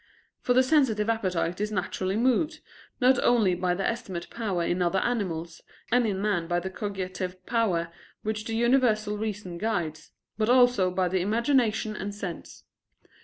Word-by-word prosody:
For 245 - +1
the 255 - +6
sensitive 255 -7 +2
appetite 185 -4 -1
is 210 0 -1
naturally 185 -1 -2
moved, 260 +7 +1 0.4
not 255 0 +4
only 220 -7 +4
by 180 0 0
the 195 - -3
estimative 195 -7 -3
power 200 -7 -2
in 175 +2 0
other 175 +2 +1
animals, 170 -8 -2 0.3
and 245 -1 +3
in 195 -3 -1
man 195 -5 0
by 175 0 +1
the 190 +2 -5
cogitative 185 -2 -5
power 185 -8 0 0.3
which 215 0 -3
the 225 - -3
universal 230 -3 +2
reason 205 -5 -4
guides, 170 -8 -2 0.3
but 215 +1 +1
also 245 -6 +5
by 180 0 0
the 185 +1 0
imagination 225 +1 +1
and 205 0 -5
sense. 190 -5 -7
210 Hz, 160 wpm, -27 LUFS, 180-230 Hz, 0.4 s, the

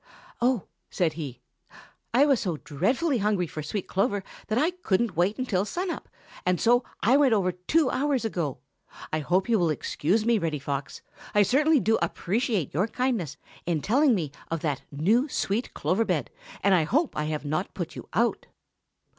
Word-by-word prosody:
"Oh," 245 -4 +2 0.3
said 170 -4 0
he, 140 -6 -7 0.7
"I 260 +5 +5
was 275 -5 +3
so 175 -5 -2
dreadfully 245 - 0
hungry 205 -3 +1
for 155 -1 -6
sweet 180 +6 -4
clover 195 +1 0 0.2
that 215 - 0
I 315 +7 +3
couldn't 235 - 0
wait 180 +6 +1
until 220 -8 0
sun 355 - -2
up, - - -7 0.3
and 180 -1 +1
so 245 +2 +4 0.2
I 250 +6 +5
went 275 -5 +4
over 185 -3 +1
two 250 - +1
hours 270 -2 0
ago. 170 - -2 0.6
I 155 - +1
hope 180 +5 +1
you 230 -3 +3
will 170 -2 +2
excuse 175 +7 0
me, 235 -2 +3
Reddy 165 -4 -1
Fox. 140 0 -5 0.3
I 205 - +6
certainly 295 +8 +4
do 225 -1 +2
appreciate 210 - -1
your 180 +9 +1
kindness 225 - -1 0.3
in 165 -4 0
telling 265 +3 +4
me 160 -7 -2 0.2
of 165 -1 -2
that 145 -4 -1
new, 215 - +2
sweet 220 0 -1
clover 180 +9 +1
bed - - -1 0.3
and 200 - +5
I 175 -4 +4
hope 290 - +1
I 150 - -1
have 155 -1 -3
not 155 +6 -2
put 175 -3 -5
you - - -9
out." 230 +6 +1
200 Hz, 180 wpm, -27 LUFS, 165-245 Hz, 0.7 s, I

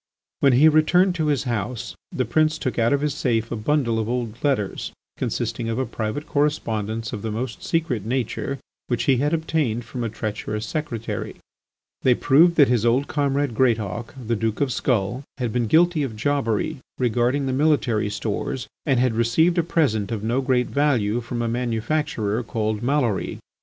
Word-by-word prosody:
When 135 -2 +4
he 140 +6 +6
returned 175 +4 +4
to 160 -3 -1
his 145 -3 +1
house, 120 -1 -3 0.2
the 130 - -1
prince 155 +6 +2
took 130 -5 -2
out 115 0 +3
of 140 0 +2
his 150 -1 0
safe 115 -6 0
a - - -1
bundle 115 0 +1
of 110 0 -2
old 120 -2 -3
letters 130 -9 -1 0.2
consisting 115 - -2
of 115 - -2
a 130 - 0
private 115 +5 -4
correspondence 115 -7 -1
of 105 - -4
the 110 - -3
most 115 +1 -4
secret 155 -10 -1
nature, 130 +3 -2 0.3
which 120 -2 0
he 135 -2 +3
had 145 +4 +1
obtained 155 -8 0
from 120 +2 -5
a 115 - -1
treacherous 105 0 -4
secretary. 115 -3 -4 0.7
They 125 -2 +4
proved 160 +8 +5
that 145 -4 +6
his 120 -3 +2
old 125 +4 +2
comrade 140 -3 0
Greatauk, 110 -2 0
the 115 +1 0
Duke 110 0 -1
of 140 -3 +1
Skull, 120 0 0 0.2
had 120 -5 -2
been 120 -2 +1
guilty 170 - +4
of 130 -6 -3
jobbery 135 +2 0 0.2
regarding 125 +3 +1
the 130 - -1
military 130 -7 +2
stores 110 +4 -3 0.2
and 135 -4 +3
had 125 -2 +2
received 115 +10 +3
a - - +5
present 120 - +1
of 110 -2 -3
no 120 +4 +1
great 125 -2 +2
value 120 -7 +1
from 120 0 -3
a - - 0
manufacturer 120 -1 -1
called 110 -2 -2
Maloury. 125 -5 0
125 Hz, 180 wpm, -23 LUFS, 115-145 Hz, 0.7 s, he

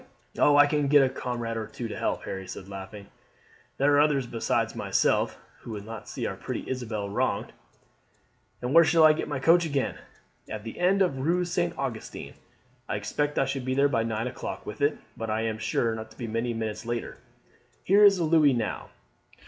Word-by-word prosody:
"Oh, 145 0 +5
I 145 - +8
can 145 -1 0
get 145 0 +6
a 130 - +2
comrade 120 -3 -4
or 110 -1 -4
two 125 -4 -6
to - - -6
help," - - -2
Harry 95 -1 -6
said 95 +1 -8
laughing. 100 +1 -8 0.7
"There 145 +2 +3
are 145 - +5
others 145 -3 +3
besides 115 -1 -1
myself - - +1 0.2
who - - -12
will 105 -2 -5
not 110 +1 -9
see - - -4
our - - -3
pretty - - -5
Isabel 110 -5 -3
wronged." 100 - -1 1.1
"And 125 +2 -1
where 165 +1 +8
shall 160 0 +4
I 155 0 +8
get 155 - -3
my 145 - -2
coach 165 +6 +4
again?" 140 -5 -2 0.5
"At 105 -1 -5
the 115 - -8
end 190 +2 +4
of 140 -8 -1
the - - -4
Rue 175 +5 +1
St. 175 0 -1
Augustin. 130 -5 -5 0.6
I - - -1
expect 145 0 -2
I - - +3
shall 135 0 -3
be 130 +1 -2
there 140 +1 +4
by 115 -5 +1
nine 115 0 -2
o'clock 125 0 -6
with 105 - -7
it; 145 +1 +2 0.2
but 115 -1 -5
I 110 +1 0
am 110 -1 -2
sure 115 +1 0
not 110 0 -6
to 110 - -19
be 120 - -5
many 115 +2 -2
minutes 110 -1 -4
later. 120 0 -4 0.7
Here 200 +3 +5
is 200 -2 +7
a 175 - 0
louis 155 -3 +4
now. 115 -3 -3
130 Hz, 210 wpm, -27 LUFS, 110-150 Hz, 1.1 s, I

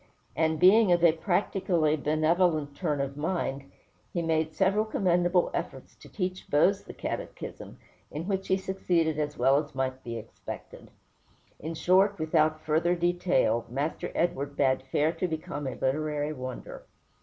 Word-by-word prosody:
And, 160 +1 +1
being 195 +2 +6
of 175 -1 +3
a 170 - +7
practically 175 -2 +1
benevolent 155 0 +1
turn 150 -5 -1
of 140 0 -3
mind, 145 -4 -2 0.4
he 170 - -2
made 160 -1 0
several 195 +2 +2
commendable 180 -4 +1
efforts - - -5
to - - -15
teach 185 -2 -4
Bose 190 +7 +3
the - - -8
Catechism, - - -6 0.3
in 160 +4 -6
which 195 -1 -2
he 190 - +2
succeeded 175 -5 0
as 150 0 -2
well 135 +3 +4
as 145 - -16
might 130 0 -2
be 115 -1 -5
expected. 115 0 -9 0.7
In 160 +2 -5
short, 190 +5 +3
without 155 -1 +1
further 165 +3 +2
detail, 170 -10 +1
Master 140 +6 -3
Edward 145 -5 -1
bade 130 -2 +2
fair 150 +2 +2
to 185 - -2
become 155 -3 -4
a 130 - -4
literary 150 +2 -1
wonder. 130 -2 -8
160 Hz, 150 wpm, -28 LUFS, 145-180 Hz, 0.7 s, a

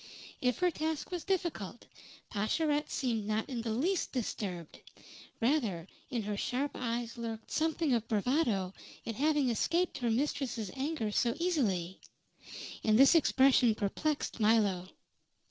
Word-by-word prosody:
If 250 -1 +1
her 360 -1 +2
task 315 0 -3
was 355 -2 -3
difficult, 340 - -2 0.5
Pascherette 295 +8 0
seemed 230 -6 -1
not 215 +1 0
in 245 -3 -3
the 230 - -3
least 320 - 0
disturbed; 195 - -4 0.6
rather 225 - +1 0.2
in 240 -5 -2
her 205 0 -2
sharp 260 +7 -1
eyes 235 0 -3
lurked 225 -1 -6
something 320 -2 +1
of 230 -2 0
bravado 215 - +1 0.3
at 230 - -3
having 290 0 +2
escaped 340 - 0
her 240 -2 0
mistress's 240 -4 -1
anger 265 -5 -2
so 235 +3 +1
easily. 205 - 0 0.8
And 215 -1 +4
this 270 +4 +8
expression 265 -7 +5
perplexed 280 +8 -2
Milo. 210 -5 +3
240 Hz, 130 wpm, -32 LUFS, 215-300 Hz, 0.8 s, this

